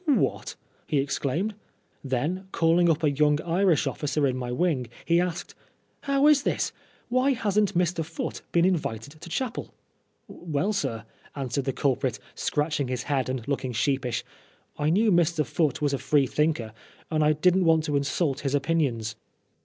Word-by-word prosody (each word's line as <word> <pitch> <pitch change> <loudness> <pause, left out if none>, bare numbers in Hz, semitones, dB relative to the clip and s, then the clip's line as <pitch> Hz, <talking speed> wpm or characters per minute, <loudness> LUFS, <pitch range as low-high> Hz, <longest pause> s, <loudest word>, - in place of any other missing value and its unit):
" - - -34
What! 290 -4 +1 0.2
" - - -37
he 150 - 0
exclaimed. 145 +8 -1 0.5
Then, 150 +9 -2
call 165 +1 +3
ing 175 -1 +4
up 160 -1 +1
a 150 - +4
young 150 +1 +3
Irish 175 -1 +2
officer 150 0 -1
in 130 -2 +1
my 125 -1 -4
wing, 130 -2 0 0.2
he 170 +1 +3
asked 175 -1 -3 0.3
" - - -42
How 275 +1 +3
is 300 -2 +6
this? - - -1 0.4
Why 255 +3 +3
hasn't 205 -4 +1
Mr. 175 -1 +1
Foote 165 +1 -5
been 170 0 +3
invited 150 - -2
to 170 - -9
chapel? 245 +6 -4 0.2
" - - -44
" - - -46
Well, 165 +4 -2
sir," 115 - -2 0.3
answered 135 -1 -2
the 135 - +1
culprit, 135 -2 0 0.2
scratching 150 -2 -1
his 125 -1 -3
head 135 -3 -1
and 130 -2 -4
looking 135 -3 -2
sheepish, 125 +2 0 0.5
"I 150 - 0
knew 210 +6 +3
Mr. 170 -3 +2
Foote 150 +2 0
was 145 -1 +1
a 140 - -1
Free 145 -2 +3
thinker, 140 -6 0 0.4
and 155 -1 +2
I 150 +1 +4
didn't 180 +4 +3
want 160 -1 +4
to 150 -2 -1
insult 140 +1 0
his 140 0 -1
opinions." 135 -8 0
150 Hz, 180 wpm, -26 LUFS, 135-175 Hz, 0.5 s, is